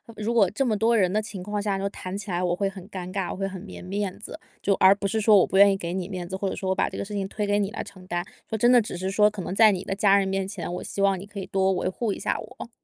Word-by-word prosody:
如 215 Hz, +2 st, -2 dB
果 225 Hz, -5 st, +4 dB
这 275 Hz, -, 0 dB
么 225 Hz, -5 st, +1 dB
多 230 Hz, +2 st, +3 dB
人 185 Hz, -5 st, +3 dB
的 210 Hz, -, +1 dB
情 210 Hz, -3 st, -6 dB
况 205 Hz, +3 st, -3 dB
下， 205 Hz, -1 st, -1 dB
就 200 Hz, +1 st, -1 dB
谈 185 Hz, -1 st, -7 dB
起 205 Hz, +1 st, -6 dB
来 180 Hz, 0 st, -1 dB
我 175 Hz, -1 st, +1 dB
会 195 Hz, +1 st, 0 dB
很 195 Hz, -1 st, -11 dB
尴 185 Hz, -3 st, -6 dB
尬， 190 Hz, -2 st, -2 dB
我 -, -, -4 dB
会 195 Hz, +1 st, -2 dB
很 190 Hz, -1 st, -7 dB
没 200 Hz, -, -10 dB
面 195 Hz, +1 st, -3 dB
子。 265 Hz, -, -9 dB, 0.2 s
就 200 Hz, -, +2 dB
而 190 Hz, +1 st, +6 dB
不 200 Hz, 0 st, -3 dB
是 220 Hz, +3 st, -1 dB
说 215 Hz, -1 st, +6 dB
我 -, -, +3 dB
不 190 Hz, -, 0 dB
愿 200 Hz, 0 st, +7 dB
意 -, -, 0 dB
给 170 Hz, -3 st, -4 dB
你 180 Hz, -1 st, -3 dB
面 180 Hz, -3 st, -6 dB
子， 190 Hz, -, -3 dB
或 195 Hz, -, -2 dB
者 -, -, -3 dB
说 190 Hz, -, -3 dB
我 190 Hz, -, +1 dB
把 -, -, +1 dB
这 -, -, -6 dB
个 -, -, -2 dB
事 205 Hz, +1 st, -7 dB
情 195 Hz, -1 st, -2 dB
推 205 Hz, +1 st, -3 dB
给 205 Hz, 0 st, +2 dB
你 205 Hz, -1 st, 0 dB
来 -, -, -4 dB
承 185 Hz, -2 st, -13 dB
担。 175 Hz, -1 st, -2 dB, 0.2 s
说 220 Hz, -, -3 dB
真 240 Hz, +3 st, +4 dB
的， 250 Hz, -, +7 dB
只 215 Hz, -, -4 dB
是 185 Hz, +2 st, -3 dB
说 210 Hz, +2 st, +4 dB
可 210 Hz, -2 st, -3 dB
能 185 Hz, +2 st, -4 dB
在 220 Hz, 0 st, +7 dB
你 190 Hz, -2 st, -3 dB
的 195 Hz, -, -3 dB
家 200 Hz, 0 st, +4 dB
人 195 Hz, -, 0 dB
面 195 Hz, 0 st, -1 dB
前， 190 Hz, -4 st, -5 dB
我 180 Hz, -, -4 dB
希 200 Hz, -, -4 dB
望 195 Hz, -1 st, +3 dB
你 190 Hz, -, -8 dB
可 205 Hz, 0 st, -8 dB
以 190 Hz, -, -6 dB
多 190 Hz, 0 st, +1 dB
维 180 Hz, -, -1 dB
护 210 Hz, +2 st, -2 dB
一 -, -, -7 dB
下 -, -, -1 dB
我。 -, -, -9 dB
195 Hz, 375 characters per minute, -25 LUFS, 190-210 Hz, 0.2 s, 愿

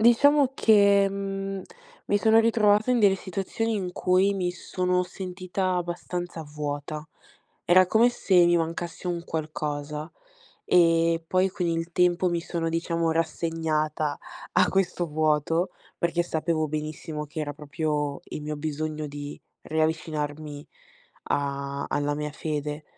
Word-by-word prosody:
Diciamo 270 Hz, +4 st, +5 dB
che, 200 Hz, -4 st, +5 dB
mhmm, 195 Hz, 0 st, -4 dB, 0.4 s
mi 205 Hz, -, +2 dB
sono 220 Hz, +1 st, +5 dB
ritrovata 220 Hz, 0 st, +4 dB
in 245 Hz, -, +2 dB
delle 200 Hz, -2 st, +5 dB
situazioni 195 Hz, +5 st, -2 dB
in 185 Hz, -4 st, -2 dB
cui, 185 Hz, +3 st, +3 dB
mi 185 Hz, -3 st, -1 dB
sono 180 Hz, 0 st, 0 dB
sentita 185 Hz, 0 st, -3 dB
abbastanza 175 Hz, -1 st, -4 dB
vuota. 150 Hz, +1 st, -5 dB, 0.6 s
Era 185 Hz, +2 st, +6 dB
come 225 Hz, +6 st, +5 dB
se 185 Hz, -7 st, +3 dB
mi 175 Hz, 0 st, +4 dB
mancasse 170 Hz, +2 st, -3 dB
un 170 Hz, -1 st, -3 dB
qualcosa, 150 Hz, -1 st, -4 dB, 0.5 s
e 165 Hz, -1 st, +4 dB
poi 185 Hz, +3 st, +2 dB
con 180 Hz, -1 st, -3 dB
il 165 Hz, 0 st, -1 dB
tempo 180 Hz, +1 st, +3 dB
mi 170 Hz, -1 st, 0 dB
sono 165 Hz, -1 st, -2 dB
diciamo 165 Hz, 0 st, 0 dB
rassegnata, 160 Hz, -2 st, -1 dB, 0.3 s
a -, -, +4 dB
questo 180 Hz, -2 st, 0 dB
vuoto, 155 Hz, +3 st, +1 dB, 0.3 s
perché 170 Hz, 0 st, +1 dB
sapevo 160 Hz, -1 st, -1 dB
benissimo, 155 Hz, 0 st, -4 dB
che 155 Hz, +2 st, -6 dB
era 145 Hz, -1 st, -3 dB
proprio, 150 Hz, -1 st, -2 dB
il -, -, -7 dB
mio 150 Hz, 0 st, -4 dB
bisogno 155 Hz, 0 st, -3 dB
di 145 Hz, 0 st, -7 dB, 0.2 s
riavvicinarmi 155 Hz, -2 st, -2 dB, 0.6 s
a 140 Hz, 0 st, -2 dB
alla 145 Hz, 0 st, 0 dB
mia 150 Hz, 0 st, -3 dB
fede. 150 Hz, -1 st, -4 dB
165 Hz, 130 wpm, -26 LUFS, 150-185 Hz, 0.6 s, Era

